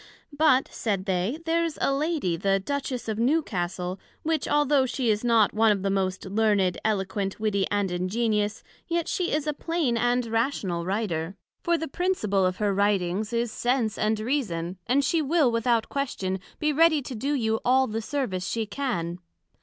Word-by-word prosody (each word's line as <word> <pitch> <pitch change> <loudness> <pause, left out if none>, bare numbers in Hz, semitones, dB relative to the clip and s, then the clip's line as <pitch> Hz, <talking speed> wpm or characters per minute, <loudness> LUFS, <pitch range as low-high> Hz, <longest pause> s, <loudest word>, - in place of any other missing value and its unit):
But, 290 -3 +4
said 200 -4 -2
they, 190 +7 0
there's 330 -1 0
a 275 - +2
Lady, 290 - 0
the 195 +3 +1
Duchess 265 +3 -3
of 220 -1 -2
Newcastle; 190 - -1 0.2
which 320 0 0
although 290 -2 +3
she 245 -3 0
is 210 +2 -1
not 230 -4 +4
one 220 0 +4
of 195 -2 -1
the 195 - +1
most 190 -1 -1
learned, 200 -2 +2
eloquent, 195 -2 -1
witty 205 -3 +1
and 205 -2 0
ingenious, 210 +3 -1 0.2
yet 340 -1 -1
she 360 -1 -1
is 300 0 0
a 300 - 0
plain 305 -6 -1
and 245 +1 +1
rational 225 -7 -1
Writer; 190 -3 -2 0.3
for 340 0 +2
the 320 0 -4
principle 220 - +1
of 185 0 -3
her 205 -2 +1
Writings, 200 +1 +1
is 235 -1 0
Sense 240 -3 0
and 215 0 0
Reason, 195 - -2
and 275 +4 +3
she 330 - +2
will 300 -3 +3
without 230 -1 +1
question, 195 -9 -2 0.2
be 305 -1 0
ready 315 -1 +4
to 255 - -6
do 275 +6 -1
you 220 -4 0
all 260 +1 +4
the 225 -1 -3
service 215 -8 -2
she 225 +1 -1
can. 200 -8 -3
225 Hz, 175 wpm, -26 LUFS, 195-275 Hz, 0.3 s, But